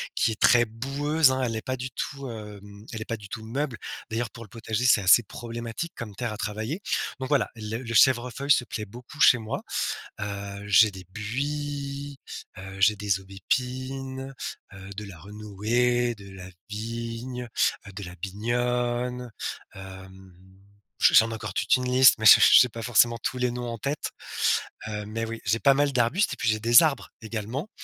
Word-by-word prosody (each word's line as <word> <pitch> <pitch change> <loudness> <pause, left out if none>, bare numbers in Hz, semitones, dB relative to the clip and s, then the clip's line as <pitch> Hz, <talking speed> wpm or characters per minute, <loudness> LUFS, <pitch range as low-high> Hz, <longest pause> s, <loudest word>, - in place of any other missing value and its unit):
qui 115 - +2
est 110 - -7
très 120 -1 +6
boueuse, 140 +6 +1
hein. 130 0 -1
Elle 115 -2 -1
est 110 - -3
pas 130 -1 -3
du 130 +1 -5
tout, 140 -2 -5
hem, 105 -1 -10
elle 110 - -5
est - - -5
pas 115 - -3
du 100 -2 -13
tout 110 -2 -6
meuble. 130 +1 -3 0.3
D'ailleurs, 115 +1 -2
pour 115 -1 -10
le - - -20
potager 115 +2 -3
c'est 115 -5 +5
assez 100 +5 +6
problématique 115 +9 -6
comme 105 -4 -7
terre 120 -2 -3
à - - -7
travailler. 110 - -4 0.4
Donc 130 - -4
voilà, 140 -4 +2
les 110 +1 -5
le 115 -2 -6
chèvrefeuille 125 +4 +3
se 130 - +5
plaît 110 - -5
beaucoup 125 +8 -13
chez 120 - +7
moi. 110 -1 -4 0.6
Heu, 100 0 -6
j'ai 105 +2 +6
des 95 -1 -11
buis, 140 +5 -4 0.4
heu, 95 0 -9
j'ai 105 +3 +5
des 100 -2 0
aubépines, 130 +6 -4 0.4
heu, 95 0 -11
de 105 - -4
la 95 -4 -11
renouée, 110 +5 0
de 100 -1 -13
la 90 -1 -10 0.2
vigne, 115 +3 -5 0.5
de 100 +1 -7
la 90 0 -9
binogne, 120 +5 -2 0.5
hem. 95 -1 -11 0.7
Je - - +6
j'en 115 0 +6
ai - - -4
encore - - -6
toute - - +2
une 125 0 -3
liste, 130 +1 +7
mais 110 - -3
j'ai - - +10
j'ai - - +8
j'ai 125 - +3
pas 115 +1 -8
forcément 120 0 +4
tous 130 - -2
les 125 -1 0
noms 120 0 -5
en 115 - -5
tête. 140 +5 -3 0.8
Hem, 105 -1 -5
mais 115 0 -2
oui, 115 0 -6
j'ai 110 +4 +1
pas 140 -1 +5
mal 145 0 +2
d'arbustes 130 - +2
et - - -5
puis 115 - -2
j'ai 110 0 +1
des 120 +6 +7
arbres 145 -5 0
également. 115 - -5
115 Hz, 190 wpm, -26 LUFS, 105-130 Hz, 0.8 s, j'ai